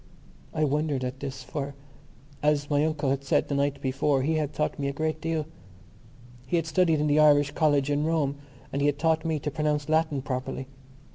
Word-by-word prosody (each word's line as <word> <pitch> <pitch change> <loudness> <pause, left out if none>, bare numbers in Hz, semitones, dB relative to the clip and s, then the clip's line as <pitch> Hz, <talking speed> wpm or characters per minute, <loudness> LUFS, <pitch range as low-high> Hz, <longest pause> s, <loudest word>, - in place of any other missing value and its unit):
I 155 - 0
wondered 150 -2 0
at 130 +1 -4
this 135 -2 -6
for, 140 0 -5 0.7
as 150 0 +1
my 145 0 +3
uncle 150 -3 0
had 140 0 -1
said 135 - +1
the - - -1
night 140 0 0
before, 135 +1 +1
he 160 +4 +1
had 150 -2 -1
taught 150 - -2
me 140 - -1
a - - 0
great 155 +2 -2
deal. 160 -2 -1 1.0
He 155 - 0
had 165 -2 +1
studied 165 -1 +2
in 150 - +1
the 150 0 +3
Irish 145 -1 +5
college 145 -2 +2
in 145 +1 +1
Rome 155 -3 0 0.4
and 140 - -1
he 145 - +3
had 145 -1 +1
taught 160 0 +1
me 160 -1 0
to 150 +1 -3
pronounce 150 -1 -1
Latin 155 -3 +1
properly. 130 -1 -3
145 Hz, 205 wpm, -27 LUFS, 140-155 Hz, 1.0 s, Irish